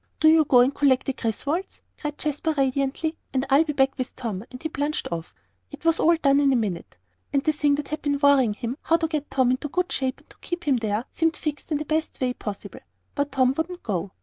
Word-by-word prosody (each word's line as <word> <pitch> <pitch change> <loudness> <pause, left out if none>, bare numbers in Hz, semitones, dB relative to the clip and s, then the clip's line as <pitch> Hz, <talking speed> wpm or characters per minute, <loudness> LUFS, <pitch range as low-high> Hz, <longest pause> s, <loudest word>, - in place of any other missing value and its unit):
"Do 315 - +6
you 315 -1 +6
go 250 -3 +6
and 260 +3 +3
collect 270 -3 +3
the 270 - -1
Griswolds," 280 - -3 0.2
cried 295 0 -4
Jasper, 305 +1 -1
radiantly, 275 +4 0 0.2
"and 260 +1 +1
I'll 280 +4 +6
be 305 -2 -3
back 270 -1 +2
with 255 - -3
Tom," 220 -6 -4
and 255 0 -11
he - - 0
plunged 295 0 -2
off. 165 -1 -5 0.3
It 290 +2 -12
was 330 0 +3
all 335 +1 +5
done 280 -3 +3
in 280 -1 +4
a - - +3
minute. 200 - -3 0.3
And 275 -1 +1
the 310 - +3
thing 295 -1 +2
that 290 0 -5
had 305 0 -3
been 285 -1 0
worrying 275 -6 +4
him 235 +4 -4
how 330 - +3
to 325 0 -1
get 305 -2 -3
Tom 260 -2 +2
into 260 +4 -1
good 360 +5 -1
shape, 265 0 -2
and - - -31
to - - -15
keep 345 0 -4
him 280 -5 +2
there 220 0 -1
seemed 325 -1 0
fixed 300 +1 -5
in 300 - +2
the 305 - -4
best 315 +1 -2
way 255 -1 0
possible. 210 -5 -7 0.3
But 285 0 -1
Tom 260 -1 +3
wouldn't 350 +3 -4
go. 190 -3 -2
285 Hz, 245 wpm, -25 LUFS, 255-310 Hz, 0.3 s, Do